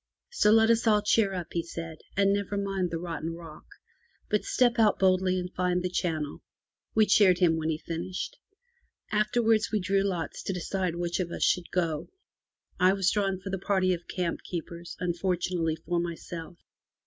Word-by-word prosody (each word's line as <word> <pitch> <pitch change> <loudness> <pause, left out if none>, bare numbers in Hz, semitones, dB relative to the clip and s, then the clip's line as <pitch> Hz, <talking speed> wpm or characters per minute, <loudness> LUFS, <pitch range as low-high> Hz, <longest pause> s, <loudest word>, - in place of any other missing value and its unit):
So 345 - +3
let 225 +1 +6
us 230 0 +2
all 210 -1 +4
cheer 210 -1 +3
up, 175 -2 -5
he 170 - +1
said, 165 -1 -7 0.2
and 200 0 +4
never 200 0 -2
mind 195 -2 -1
the 165 - -3
rotten 165 -1 -4
rock, 165 -2 -11 0.6
but 210 - +2
step 245 -2 +2
out 215 -2 +4
boldly 185 -1 +3
and 180 0 -4
find 180 0 0
the 180 - -2
channel. 155 -5 -2 0.5
We 220 -1 +6
cheered 195 -3 +5
him 175 -3 +4
when 160 0 -1
he 155 - 0
finished. 180 - -5 0.7
Afterwards 215 +1 +2
we 215 - +1
drew 195 +1 +1
lots 180 -6 -2
to 195 - -1
decide 180 0 -2
which 175 0 -2
of 180 -2 -1
us - - -3
should 180 -2 +2
go. 165 -4 -1 0.7
I 185 +1 +5
was 195 -2 +2
drawn 195 -3 0
for 195 - -6
the 195 - -2
party 190 -2 +2
of 175 -1 -6
camp 180 -2 -2
keepers, 170 0 -7
unfortunately 175 -2 -1
for 170 +1 -2
myself. 170 0 -6
180 Hz, 180 wpm, -28 LUFS, 170-200 Hz, 0.7 s, let